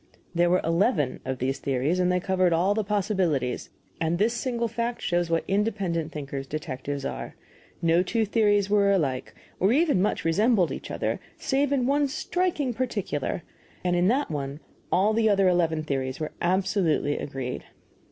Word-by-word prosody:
There 175 Hz, 0 st, +3 dB
were 180 Hz, +1 st, +3 dB
eleven 165 Hz, -, +1 dB
of 130 Hz, 0 st, -2 dB
these 130 Hz, +2 st, -1 dB
theories, 140 Hz, +6 st, 0 dB
and 180 Hz, 0 st, +3 dB
they 180 Hz, -, +2 dB
covered 185 Hz, -1 st, +2 dB
all 180 Hz, +5 st, +3 dB
the 215 Hz, +1 st, 0 dB
possibilities; 190 Hz, -, 0 dB, 0.3 s
and 165 Hz, +1 st, 0 dB
this 220 Hz, +5 st, +2 dB
single 235 Hz, -1 st, -1 dB
fact 235 Hz, +2 st, -3 dB
shows 175 Hz, -1 st, 0 dB
what 165 Hz, 0 st, +1 dB
independent 195 Hz, -6 st, 0 dB
thinkers 140 Hz, -2 st, -5 dB
detectives 140 Hz, -1 st, -4 dB
are. 60 Hz, -1 st, -5 dB, 0.5 s
No 165 Hz, +1 st, +4 dB
two 220 Hz, +4 st, 0 dB
theories 205 Hz, -2 st, +2 dB
were 200 Hz, -1 st, +3 dB
alike, 140 Hz, -10 st, -1 dB, 0.2 s
or 190 Hz, +3 st, +3 dB
even 290 Hz, -, +3 dB
much 205 Hz, -, 0 dB
resembled 195 Hz, +2 st, +3 dB
each -, -, -6 dB
other, -, -, -2 dB, 0.2 s
save 275 Hz, +1 st, 0 dB
in 265 Hz, -3 st, +2 dB
one 285 Hz, +2 st, +2 dB
striking 310 Hz, -2 st, -1 dB
particular, 205 Hz, -, -2 dB, 0.4 s
and 180 Hz, -1 st, +1 dB
in 175 Hz, +1 st, +3 dB
that 260 Hz, -, +1 dB
one 140 Hz, -1 st, -4 dB, 0.3 s
all 205 Hz, +4 st, +3 dB
the 220 Hz, 0 st, +3 dB
other 195 Hz, -2 st, +4 dB
eleven 165 Hz, -3 st, +2 dB
theories 135 Hz, -3 st, -2 dB
were 155 Hz, -, -3 dB
absolutely 180 Hz, -5 st, +1 dB
agreed. 130 Hz, -3 st, -5 dB
180 Hz, 165 wpm, -26 LUFS, 155-215 Hz, 0.5 s, No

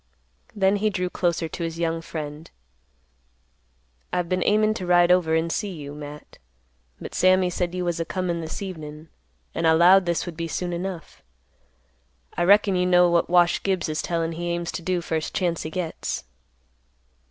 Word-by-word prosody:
Then 195 Hz, 0 st, +3 dB
he 215 Hz, +1 st, +1 dB
drew 180 Hz, -3 st, -2 dB
closer 170 Hz, -2 st, 0 dB
to 170 Hz, +2 st, -6 dB
his 165 Hz, 0 st, -4 dB
young 165 Hz, -1 st, -1 dB
friend; 155 Hz, -1 st, -7 dB, 1.6 s
"I've 180 Hz, -1 st, -1 dB
been 185 Hz, +1 st, 0 dB
aimin' 215 Hz, +1 st, +3 dB
to 180 Hz, -, -5 dB
ride 175 Hz, 0 st, +5 dB
over 170 Hz, -3 st, +3 dB
and 165 Hz, +1 st, 0 dB
see 205 Hz, +3 st, -2 dB
you, 145 Hz, -6 st, -7 dB
Matt; 150 Hz, 0 st, -10 dB, 0.6 s
but -, -, -8 dB
Sammy 185 Hz, -1 st, +3 dB
said 175 Hz, 0 st, -2 dB
you 180 Hz, -1 st, -2 dB
was 175 Hz, -1 st, -1 dB
a -, -, +1 dB
comin' 175 Hz, -2 st, -2 dB
this 160 Hz, +5 st, -5 dB
evenin', 155 Hz, -4 st, -8 dB, 0.4 s
and 165 Hz, 0 st, 0 dB
I 160 Hz, -, +6 dB
'lowed 180 Hz, +3 st, +6 dB
this 170 Hz, -1 st, 0 dB
would 175 Hz, -2 st, -7 dB
be 165 Hz, +1 st, -4 dB
soon 175 Hz, +2 st, -3 dB
enough. 180 Hz, 0 st, -6 dB, 1.1 s
I 175 Hz, -, +1 dB
reckon 200 Hz, 0 st, +5 dB
you 180 Hz, 0 st, +1 dB
know 180 Hz, -1 st, +5 dB
what 170 Hz, -1 st, +2 dB
Wash 175 Hz, -1 st, +4 dB
Gibbs 190 Hz, -3 st, 0 dB
is 155 Hz, -, -1 dB
tellin' 165 Hz, -1 st, -1 dB
he 175 Hz, +1 st, -4 dB
aims 170 Hz, 0 st, -2 dB
to -, -, -5 dB
do 180 Hz, +1 st, -1 dB
first 160 Hz, -2 st, -3 dB
chance 175 Hz, -3 st, 0 dB
he 155 Hz, -, -5 dB
gets." 170 Hz, -1 st, -4 dB
175 Hz, 180 wpm, -24 LUFS, 165-185 Hz, 1.6 s, I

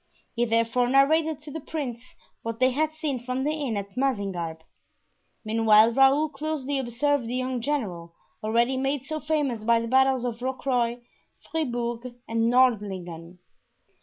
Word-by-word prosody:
He 240 Hz, 0 st, +1 dB
therefore 230 Hz, +2 st, +1 dB
narrated 305 Hz, +3 st, +3 dB
to 300 Hz, -1 st, -10 dB
the 320 Hz, -, -5 dB
prince 255 Hz, -7 st, -6 dB, 0.3 s
what 230 Hz, 0 st, -4 dB
they 255 Hz, 0 st, +4 dB
had 310 Hz, +4 st, 0 dB
seen 305 Hz, -4 st, -3 dB
from 255 Hz, +2 st, -3 dB
the 295 Hz, -, +1 dB
inn 285 Hz, -8 st, -2 dB
at 200 Hz, 0 st, -6 dB
Mazingarbe. 195 Hz, -11 st, -2 dB, 0.8 s
Meanwhile 220 Hz, 0 st, +5 dB
Raoul 270 Hz, +4 st, +5 dB
closely 285 Hz, -1 st, -3 dB
observed 265 Hz, +1 st, 0 dB
the 245 Hz, -, -3 dB
young 255 Hz, -1 st, -2 dB
general, 185 Hz, -12 st, -3 dB, 0.3 s
already 235 Hz, +4 st, +2 dB
made 270 Hz, 0 st, -1 dB
so 310 Hz, +2 st, -3 dB
famous 295 Hz, -7 st, -1 dB
by 230 Hz, +1 st, +4 dB
the 230 Hz, -, -3 dB
battles 260 Hz, 0 st, +3 dB
of 235 Hz, -2 st, -3 dB
Rocroy, 250 Hz, -2 st, -1 dB, 0.5 s
Fribourg, 240 Hz, -5 st, -3 dB
and 225 Hz, 0 st, +1 dB
Nordlingen. 190 Hz, -9 st, 0 dB
250 Hz, 145 wpm, -26 LUFS, 230-275 Hz, 0.8 s, Meanwhile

